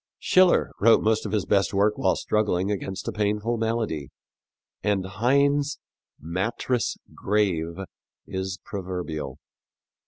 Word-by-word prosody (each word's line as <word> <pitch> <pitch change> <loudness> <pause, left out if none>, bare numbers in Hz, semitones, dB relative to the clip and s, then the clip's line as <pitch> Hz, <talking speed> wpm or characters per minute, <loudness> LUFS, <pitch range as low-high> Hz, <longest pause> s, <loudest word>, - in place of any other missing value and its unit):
Schiller 185 -1 +4
wrote 115 +2 +5
most 110 0 +1
of - - -6
his 105 -3 0
best 100 0 +2
work 105 +2 +3
while 95 - +2
struggling 105 -2 0
against 95 -1 -4
a - - 0
painful 105 +2 0
malady, 110 - -2 0.7
and 100 -2 0
Heine's 140 +8 +2 0.4
"mattress 115 - -1 0.2
grave" 90 -6 0 0.5
is 95 0 -4
proverbial. 90 -8 -5
105 Hz, 115 wpm, -25 LUFS, 95-115 Hz, 0.7 s, wrote